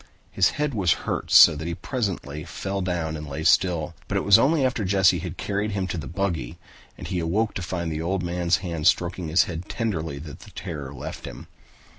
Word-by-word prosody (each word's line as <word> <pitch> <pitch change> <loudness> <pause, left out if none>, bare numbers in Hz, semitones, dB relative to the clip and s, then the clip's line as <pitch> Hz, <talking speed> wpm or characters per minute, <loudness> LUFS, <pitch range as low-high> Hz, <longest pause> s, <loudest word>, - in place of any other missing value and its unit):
His - - +3
head 150 -1 0
hurt 95 -6 0
so - - +8
that 85 +3 -5
presently 95 - -3
he 75 - -8
fell 100 0 -4
down 85 -4 -2
and 75 -1 -7
lay 75 +3 -4
still, 85 -1 +2
but - - -1
it - - 0
was 100 -1 +7
only 145 0 +3
after 125 -4 0
Jesse 95 -2 +3
had 90 +1 -6
carried 105 +1 -2
him 95 -2 -1
to 90 - -3
the 75 - -6
buggy 85 -9 -3 0.4
and - - -8
he 90 - -2
awoke 100 +7 0
to - - -4
find 85 -2 -3
the 80 0 -3
old 90 +2 -1
man's 85 0 +1
hand 85 -3 -1
stroking 85 0 +1
his 80 +4 +4
head 85 0 -6
tenderly 85 - -2
that 75 0 -9
the - - -13
terror 75 -6 -6
left 70 - -7
him. - - -9
90 Hz, 210 wpm, -24 LUFS, 80-100 Hz, 0.4 s, so